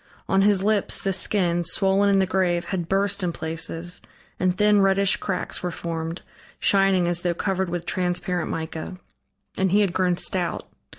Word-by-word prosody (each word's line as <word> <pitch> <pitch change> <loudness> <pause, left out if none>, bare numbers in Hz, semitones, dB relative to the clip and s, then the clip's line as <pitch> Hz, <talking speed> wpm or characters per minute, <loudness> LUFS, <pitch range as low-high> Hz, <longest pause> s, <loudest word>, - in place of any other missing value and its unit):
On 195 0 +3
his 200 -1 +3
lips 210 -1 0
the 195 - -1
skin, 175 -2 +1
swollen 195 +3 +2
in 200 - +4
the 190 - +3
grave, 180 -2 0
had 175 -4 -3
burst 200 +1 +1
in 180 -2 0
places, 165 +2 -3 0.4
and 185 0 +1
thin, 210 0 +4
reddish 195 0 +3
cracks 195 - -3
were 180 - -2
formed, 165 0 -5 0.4
shining 195 -3 +3
as 175 0 -1
though 175 -1 -1
covered 190 0 -1
with 175 0 -4
transparent 180 -1 -1
mica. 160 +3 -5 0.6
And 190 -1 +2
he 205 +2 +4
had 195 -4 +1
grown 180 -2 +1
stout. 180 -2 0
185 Hz, 170 wpm, -24 LUFS, 175-195 Hz, 0.6 s, in